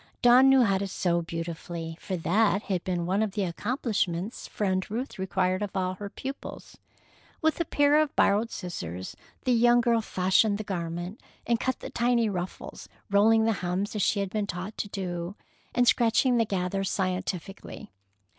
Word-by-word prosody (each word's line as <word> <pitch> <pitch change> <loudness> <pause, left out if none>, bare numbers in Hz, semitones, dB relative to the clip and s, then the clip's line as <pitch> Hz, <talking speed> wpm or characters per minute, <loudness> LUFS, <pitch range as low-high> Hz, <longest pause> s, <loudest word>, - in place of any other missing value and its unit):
Dawn 250 +2 +7
knew 270 -1 +6
how 195 -4 +2
to 200 - -2
sew 175 -2 0
beautifully, 165 0 -5
for 185 - -3
that 200 +5 +2
had 185 -3 -2
been 175 -2 -2
one 190 +4 +1
of 215 -3 -1
the 205 - -1
accomplishments 200 -1 -2
Friend 190 -2 -1
Ruth 225 -1 -4
required 185 0 0
of 205 -1 -3
all 185 0 0
her 200 +2 -7
pupils. 270 +6 -8 0.6
With 315 0 +1
a - - 0
pair 290 +1 +4
of 305 -2 -2
borrowed 210 +3 +3
scissors, 95 - -6 0.3
the 255 - +1
young 240 0 +5
girl 235 -1 +2
fashioned 200 +1 +2
the 215 - -4
garment, 175 +1 -4 0.2
and 235 -1 +1
cut 260 -1 -2
the - - -7
tiny 235 -2 +2
ruffles, 180 -1 -6 0.2
rolling 220 +2 +5
the 225 - +3
hems 185 +4 -2
as 210 - 0
she 200 +2 +2
had 195 -1 -3
been 210 -2 -1
taught 185 +3 -5
to - - -2
do, 180 -2 -4 0.4
and 245 0 +3
scratching 240 +2 +4
the 230 - +3
gathers 195 0 -1
scientifically. 185 - -4
200 Hz, 175 wpm, -27 LUFS, 180-230 Hz, 0.6 s, Dawn